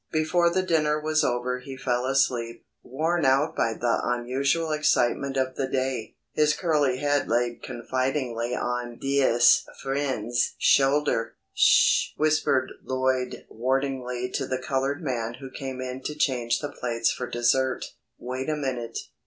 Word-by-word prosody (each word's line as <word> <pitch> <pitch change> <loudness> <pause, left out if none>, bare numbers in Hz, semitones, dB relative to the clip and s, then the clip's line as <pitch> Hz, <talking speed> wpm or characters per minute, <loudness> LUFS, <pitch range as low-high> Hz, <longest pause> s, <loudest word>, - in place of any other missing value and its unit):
Before 165 +2 +2
the 185 +2 0
dinner 155 -4 +1
was 155 0 +1
over 125 +1 -1
he 135 +1 -9
fell 125 -1 -1
asleep, 120 -3 0 0.2
worn 160 +6 -1
out 140 +4 +2
by 115 -1 0
the 120 0 0
unusual 135 +7 0
excitement 140 -2 +1
of 130 0 0
the 135 - -1
day, 130 -4 -2 0.2
his 150 0 +3
curly 150 -7 +1
head 145 0 0
laid 120 +1 0
confidingly 125 -1 -2
on 120 -1 -3
"Dea'st 135 -3 +4 0.2
Fwend's" 130 -4 -1
shoulder. 135 -4 +2 0.2
"Sh!" - - +4
whispered 150 -4 +2
Lloyd 130 -1 -1
warningly 125 0 -2
to - - -2
the 130 - -1
coloured 135 +2 -2
man 120 -4 -2
who 135 0 -10
came 130 -1 -6
in 130 0 -5
to 150 - -3
change 125 -5 0
the 145 - -3
plates 115 -4 -1
for 125 - -5
dessert. 125 +2 +1 0.3
"Wait 130 +3 -4
a 155 - 0
minute. 130 -5 -3
130 Hz, 145 wpm, -26 LUFS, 125-145 Hz, 0.3 s, Dea'st